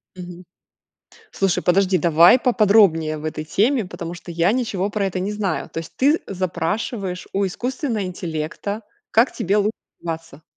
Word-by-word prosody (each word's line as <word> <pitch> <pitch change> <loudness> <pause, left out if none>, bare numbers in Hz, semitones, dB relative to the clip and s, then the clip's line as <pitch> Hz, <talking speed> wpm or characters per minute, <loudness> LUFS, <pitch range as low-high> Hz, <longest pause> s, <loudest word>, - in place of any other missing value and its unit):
Мгм. 180 0 -9 0.9
Слушай, 195 -2 0
подожди, 185 +1 +3
давай 170 +7 +6
поподробнее 200 -10 +4
об 150 - -9
этой 155 0 -4
теме, 220 - +1
потому 170 -1 -7
что 175 0 -10
я 170 +3 +2
ничего 210 -6 -1
про 205 -1 -1
это 185 -1 -3
не 195 +3 -2
знаю. 200 -5 -2
То - - -5
есть 165 - -8
ты 290 +5 +3
запрашиваешь 185 +1 -3
у 195 0 +1
искусственно 245 - -3
интеллекта, 180 +4 -4 0.3
как 230 +4 +4
тебе 195 +2 -1
л 210 0 +2 0.3
баться. 165 -2 -6
185 Hz, 155 wpm, -21 LUFS, 170-210 Hz, 0.9 s, давай